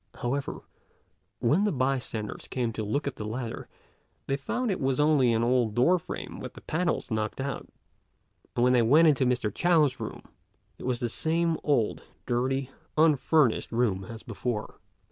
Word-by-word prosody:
However, 135 +3 -3 0.8
when 145 - +3
the 210 - +2
bystanders 130 -5 -2
came 120 -3 -2
to 110 - -3
look 140 +8 -1
at 140 - -4
the - - -5
ladder, 115 +2 -5 0.6
they 135 - 0
found 230 - -2
it 185 - -2
was 130 0 +1
only 145 -5 +4
an 115 0 +2
old 120 -3 +2
door 175 +9 +4
frame - - -7
with - - -7
the - - -11
panels 170 -4 -1
knocked 110 +2 -2
out; 140 +1 -4 0.9
and 120 - +2
when 125 0 +5
they 125 - +5
went 150 +9 +6
into 135 -4 +3
Mr. 120 -5 0
Chao's 160 -6 +3
room, - - -6 0.6
it - - -6
was 125 -2 -1
the 120 - +1
same 165 +6 0
old, 130 -8 +1 0.2
dirty, 130 +2 -1 0.3
unfurnished 155 -4 +3
room 115 -5 +1
as 115 -1 -9
before. 115 -1 -4
130 Hz, 165 wpm, -28 LUFS, 115-150 Hz, 0.9 s, went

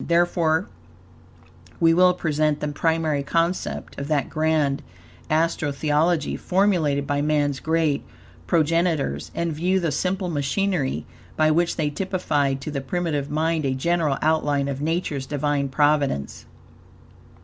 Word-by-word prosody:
Therefore, 170 0 +2 1.1
we 165 -1 +5
will 180 +1 +5
present 155 -3 0
the 150 - -2
primary 160 -1 0
concept 165 +3 -2
of 140 - -4
that 150 -2 0
grand 155 -3 +1 0.5
Astro 155 -1 +1
Theology 155 +3 +1
formulated 175 -7 +1
by 145 0 0
man's 145 -2 +1
great 160 -3 0 0.4
progenitors; 165 - +1
and 170 -1 -1
view 180 +5 +1
the 170 -4 -1
simple 185 +5 -1
machinery, 150 0 -1 0.3
by 155 0 +4
which 170 +2 +1
they 150 -2 -1
typified 145 -6 -1
to 150 - -5
the 140 -2 -3
primitive 150 -1 -2
mind 160 +1 0
a 135 -1 0
general 160 0 +1
outline 145 -3 +1
of 140 0 -4
Nature's 155 -4 -2
Divine 145 -1 -1
providence. 145 - 0
155 Hz, 125 wpm, -23 LUFS, 145-170 Hz, 1.1 s, we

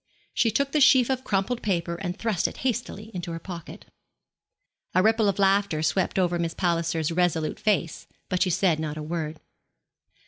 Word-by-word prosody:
She 230 - +2
took 275 +5 0
the 300 - +2
sheaf 260 -2 +6
of 260 0 -1
crumpled 210 +4 -1
paper 170 -4 -1
and 180 +1 -4
thrust 220 -7 0
it - - -8
hastily 225 -3 -3
into 175 -2 -5
her - - -4
pocket. 170 -2 -9 1.1
A 185 - +5
ripple 220 -1 +3
of 195 - -1
laughter 195 -5 +2
swept 160 +6 0
over 175 -2 +1
Miss 165 -1 -2
Palliser's 165 -2 0
resolute 165 -2 0
face; 195 -7 0 0.2
but 185 - -1
she 185 - +3
said 175 -2 +2
not 155 -1 -4
a 155 - -5
word. 155 -1 -4
180 Hz, 175 wpm, -26 LUFS, 165-210 Hz, 1.1 s, sheaf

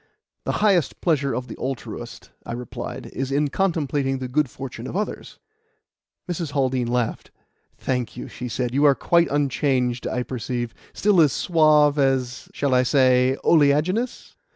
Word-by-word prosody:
"The - - -1
highest 185 -9 +2
pleasure 140 -5 +1
of 125 0 -4
the - - -8
altruist," 130 -1 -6
I - - -6
replied, 120 0 -6
"is 135 0 -3
in 145 +1 +1
contemplating 145 -6 0
the 130 -1 -4
good 140 +2 +1
fortune 130 -1 -7
of - - -7
others." 210 - -4 0.9
Mrs. 170 -4 -4
Haldean 130 -3 0
laughed. 120 -1 -2 0.5
"Thank 125 -3 -3
you," - - -6
she 125 - -7
said. 120 +1 -2
"You 140 +2 +2
are 140 -1 +6
quite 170 +3 +2
unchanged, 130 -4 0
I 125 - -1
perceive. 120 -1 -4 0.2
Still 200 -4 +3
as 145 -5 +4
suave 150 -3 +4
and 135 - +5
as 125 0 -9
shall 140 -2 -1
I 125 - +5
say 130 0 +3
oleaginous?" 165 - +2
135 Hz, 155 wpm, -23 LUFS, 125-150 Hz, 0.9 s, are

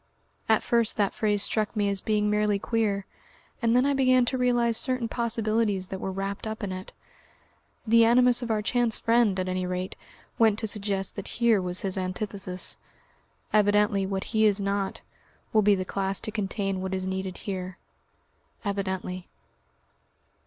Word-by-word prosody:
At 220 - +4
first 235 -2 +1
that 205 -2 +1
phrase 205 -2 0
struck 215 0 -1
me 205 -1 +1
as 200 -1 -1
being 210 -1 +1
merely 210 -1 +2
queer, 205 -2 -1 0.6
and 230 0 +2
then 250 +2 +4
I 285 - +2
began 255 -2 +4
to 260 - 0
realise 240 -2 +2
certain 255 -1 +1
possibilities 220 -4 0
that 190 - -5
were 190 - -3
wrapped 195 +2 -4
up 220 0 -5
in 195 - -2
it. 185 +1 -7 0.9
The 230 +1 +5
animus 245 +2 +4
of 240 - -4
our 215 -1 0
chance 240 0 +1
friend, 230 -4 +2
at 185 - -1
any 185 0 -2
rate, 180 +1 -3 0.4
went 220 -3 +4
to 225 - -2
suggest 200 -2 -1
that 200 - -5
here 230 -4 +4
was 180 0 -1
his 190 -1 -1
antithesis. 185 -1 -4 0.7
Evidently 205 -1 +3
what 195 -1 -2
he 220 0 +5
is 205 -1 +3
not, 200 0 -2 0.5
will 215 - +5
be 205 0 +4
the 185 -1 -3
class 195 0 -2
to 215 - -3
contain 195 -2 -2
what 190 0 -2
is 185 0 -3
needed 190 -1 -3
here. 185 -2 -5 0.9
Evidently. 190 -2 -3
205 Hz, 165 wpm, -27 LUFS, 190-225 Hz, 0.9 s, The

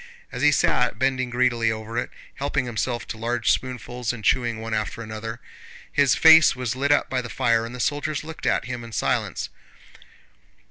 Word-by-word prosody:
As - - -5
he - - +5
sat - - +2
bending 130 0 0
greedily 120 -2 +1
over 110 +1 -6
it, 120 - -1 0.2
helping 140 -1 -2
himself 120 0 -3
to 110 - -6
large 120 +1 +1
spoonfuls 125 -1 -3
and 110 -4 -8
chewing 120 -3 +1
one 110 0 -5
after 110 +2 -3
another, 110 +1 -6 0.5
his 140 -4 +3
face 160 -3 +7
was 125 -2 -3
lit 140 +2 0
up 145 - +3
by 130 -1 -1
the 120 - -8
fire 115 -1 +1
and 120 - -9
the - - -8
soldiers 145 +3 -1
looked 160 0 -6
at - - +1
him 125 -2 -5
in 115 -1 -10
silence. - - -1
120 Hz, 185 wpm, -24 LUFS, 115-130 Hz, 0.5 s, face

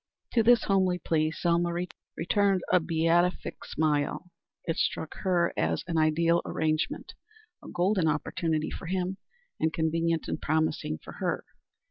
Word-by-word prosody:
To 235 - +4
this 235 +1 +5
homely 190 -2 +2
plea 155 -3 +1
Selma 170 +1 +1 0.5
returned 195 0 +2
a 180 - +7
beatific 165 +2 +1
smile. 155 +3 -1 0.3
It 165 - -1
struck 160 - -1
her 175 -2 +1
as 80 0 0
an 165 -2 0
ideal 165 +2 +3
arrangement; 155 +1 -1 0.5
a - - -10
golden 180 -1 +1
opportunity 155 0 -1
for 170 - -7
him, 185 +1 -1 0.4
and 160 - +1
convenient 165 0 0
and - - -3
promising 155 - 0
for - - -9
her. - - -1
165 Hz, 135 wpm, -28 LUFS, 160-180 Hz, 0.5 s, a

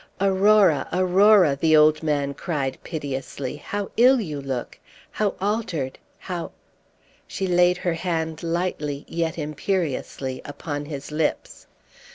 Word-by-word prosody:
"Aurora, 195 -5 +4
Aurora," 185 -2 +5
the 155 +2 +4
old 155 0 +5
man 145 -3 0
cried 140 -5 -3
piteously, 140 -3 -5
"how 200 +6 -5
ill 255 +3 +6
you 150 -9 -4
look! 130 -3 -5 0.3
how 210 -2 -1
altered, 185 - -2 0.2
how 175 -3 -6 0.4
" - - -40 0.3
She 195 - -3
laid 180 0 +3
her 175 -1 -1
hand 165 -2 -2
lightly 165 -4 -2
yet 165 -1 -2
imperiously 150 -4 -3
upon 145 0 -5
his 145 -1 -7
lips. 150 0 -2
160 Hz, 125 wpm, -24 LUFS, 145-185 Hz, 0.4 s, ill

